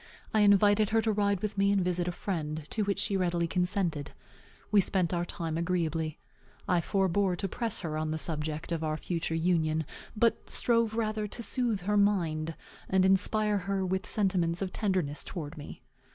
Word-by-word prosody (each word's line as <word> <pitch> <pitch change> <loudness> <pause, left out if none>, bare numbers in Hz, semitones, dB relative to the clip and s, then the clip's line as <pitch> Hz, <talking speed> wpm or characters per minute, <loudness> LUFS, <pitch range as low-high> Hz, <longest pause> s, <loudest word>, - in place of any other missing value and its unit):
I 215 - +3
invited 205 0 +5
her 225 0 +3
to 220 - +2
ride 200 -2 +1
with 210 -1 -2
me 200 0 +4
and 200 -1 +3
visit 180 -1 0
a - - 0
friend, 155 -5 -4
to 220 - 0
which 200 -1 0
she 200 - 0
readily 175 -2 +1
consented. 180 -4 -1 0.6
We 205 -2 +6
spent 180 -2 +1
our 175 0 0
time 165 -3 -3
agreeably. 165 -3 -1 0.5
I 180 -2 +3
forbore 190 +1 +1
to 195 - -2
press 230 +2 -2
her 155 -4 -3
on 155 0 -2
the 155 - -1
subject 155 0 -3
of 165 -1 -1
our 155 -1 -1
future 165 -1 -2
union, 160 -2 +1 0.3
but 230 +1 +1
strove 230 -2 +1
rather 215 -2 -1
to 235 +3 -7
soothe 230 -3 -1
her 205 +3 +1
mind, 165 -6 +1 0.3
and 190 0 +3
inspire 205 +2 +2
her 195 -1 0
with 190 +2 -2
sentiments 180 -4 +1
of 185 - -5
tenderness 185 -9 -1
towards 160 -3 -6
me. 145 - -10
185 Hz, 180 wpm, -30 LUFS, 165-205 Hz, 0.6 s, We